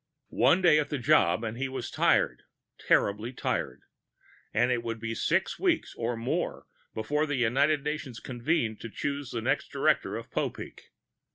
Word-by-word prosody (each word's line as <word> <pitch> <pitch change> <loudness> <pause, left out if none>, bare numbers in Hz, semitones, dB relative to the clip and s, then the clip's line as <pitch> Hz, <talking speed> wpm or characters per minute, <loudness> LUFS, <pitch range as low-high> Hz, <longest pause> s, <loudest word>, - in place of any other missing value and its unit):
One 140 +10 +5
day 155 -4 +6
at 150 -1 -1
the 145 - -1
job, 125 - +3
and 115 +1 -4
he 135 0 -1
was 130 - -5
tired, - - +2 0.4
terribly 105 +4 +1
tired. - - -3 0.7
And 120 +3 +2
it 120 -1 +1
would 115 -1 -4
be 115 0 -3
six 170 +10 0
weeks 355 -4 +1
or 115 0 -2
more 115 +2 -2 0.3
before 150 +8 0
the 145 - -1
United 140 +5 +2
Nations 150 -5 -4
convened 120 -3 -1
to 115 - -6
choose 140 +3 -3
the 115 - -3
next - - 0
director - - +1
of - - -9
Popeek. - - -4
125 Hz, 165 wpm, -28 LUFS, 115-150 Hz, 0.7 s, day